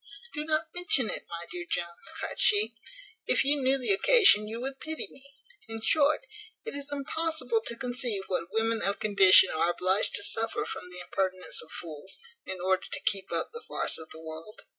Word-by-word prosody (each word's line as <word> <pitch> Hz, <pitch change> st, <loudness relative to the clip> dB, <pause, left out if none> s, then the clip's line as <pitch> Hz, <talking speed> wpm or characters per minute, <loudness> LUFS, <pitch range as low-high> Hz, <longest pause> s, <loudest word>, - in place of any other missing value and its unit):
"Do 300 Hz, -, -3 dB
not 310 Hz, 0 st, -2 dB
mention 355 Hz, -9 st, +3 dB
it, -, -, -2 dB
my 170 Hz, 0 st, -6 dB
dear 350 Hz, -1 st, -6 dB
Mr -, -, -4 dB
Jones," 170 Hz, -1 st, -3 dB
cried -, -, -5 dB
she. 420 Hz, +1 st, +5 dB, 0.5 s
"If -, -, +3 dB
you 285 Hz, 0 st, +3 dB
knew 265 Hz, +1 st, +2 dB
the 265 Hz, +9 st, +1 dB
occasion, 390 Hz, -, +5 dB
you 225 Hz, +2 st, -6 dB
would 270 Hz, +2 st, -6 dB
pity 315 Hz, -1 st, -4 dB
me. 265 Hz, -, -10 dB, 0.4 s
In 225 Hz, 0 st, -6 dB
short, 300 Hz, -, +2 dB, 0.4 s
it -, -, -5 dB
is 285 Hz, 0 st, -4 dB
impossible 320 Hz, -, -1 dB
to 235 Hz, -, -3 dB
conceive 245 Hz, -5 st, -1 dB
what 180 Hz, -1 st, -4 dB
women 225 Hz, +1 st, 0 dB
of 200 Hz, +1 st, 0 dB
condition 195 Hz, -3 st, +6 dB
are 160 Hz, +2 st, +1 dB
obliged 185 Hz, +3 st, +1 dB
to 205 Hz, -, 0 dB
suffer 225 Hz, +2 st, -1 dB
from 180 Hz, -, -7 dB
the 180 Hz, 0 st, -6 dB
impertinence 185 Hz, 0 st, -2 dB
of 160 Hz, -, -14 dB
fools, 160 Hz, +3 st, -8 dB, 0.3 s
in 190 Hz, -1 st, -5 dB
order 185 Hz, +1 st, 0 dB
to -, -, -1 dB
keep 195 Hz, -1 st, -2 dB
up -, -, +1 dB
the 465 Hz, -, -7 dB
farce -, -, -2 dB
of 160 Hz, -, -10 dB
the 160 Hz, -, -11 dB
world. 160 Hz, +6 st, -10 dB
225 Hz, 200 wpm, -28 LUFS, 185-290 Hz, 0.5 s, condition